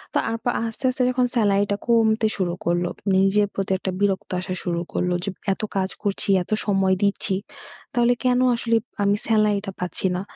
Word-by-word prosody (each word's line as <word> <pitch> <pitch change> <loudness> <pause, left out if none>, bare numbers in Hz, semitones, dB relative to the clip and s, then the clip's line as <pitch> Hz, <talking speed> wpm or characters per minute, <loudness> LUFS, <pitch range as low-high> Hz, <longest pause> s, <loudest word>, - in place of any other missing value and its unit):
তারপর 230 +1 0
আস্তে, 225 +3 -6
আস্তে 255 0 -2
যখন 250 0 +2
সেলারিটা 205 -2 +2
কমতে 225 -1 +3
শুরু 180 -3 0
করলো, 175 +1 +1 0.3
নিজের 195 +2 +3
প্রতি 195 0 -3
একটা 190 0 -3
বিরক্ত 200 -1 0
আসা 185 0 -4
শুরু 170 -2 -1
করলো 180 0 0
যে, 200 - -2 0.2
এত - - -8 0.2
কাজ 190 -1 0
করছি, 200 -1 -1
এত - - -19
সময় 195 -2 +2
দিচ্ছি 200 -1 +1 0.6
তাহলে 240 0 +3
কেন 250 -1 +3 0.2
আসলে 230 0 0 0.3
আমি 200 0 +3
সেলারিটা 210 -2 +2
পাচ্ছি 180 +1 -1
না। - - -3
200 Hz, 170 wpm, -23 LUFS, 190-225 Hz, 0.6 s, কমতে